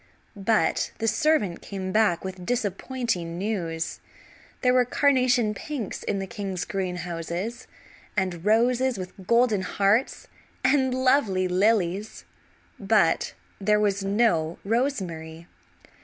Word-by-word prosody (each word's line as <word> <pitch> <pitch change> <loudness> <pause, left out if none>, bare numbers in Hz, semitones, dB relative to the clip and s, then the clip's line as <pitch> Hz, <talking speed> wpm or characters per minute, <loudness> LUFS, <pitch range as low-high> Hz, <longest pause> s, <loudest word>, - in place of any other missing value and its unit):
But 200 -4 +1
the 225 - -2
servant 220 - +1
came 190 -2 -5
back 200 -4 +2
with 190 -1 -6
disappointing 205 -4 -2
news. 175 -5 -3 0.6
There 250 -1 +3
were 255 0 +5
carnation 250 -4 +2
pinks 255 0 -5
in - - -2
the 195 - -3
king's 195 -4 -4
greenhouses, 180 +2 -4 0.5
and 185 -3 -1
roses 240 +3 +2
with 185 0 -8
golden 235 -4 +3
hearts, 200 +6 +1 0.4
and 265 -3 +3
lovely 255 -8 +2
lilies; 190 - 0 0.5
but 195 -5 +2 0.2
there 210 +1 +3
was 200 -1 +1
no 195 -6 +1
rosemary. 180 - -2
200 Hz, 110 wpm, -25 LUFS, 180-235 Hz, 0.6 s, were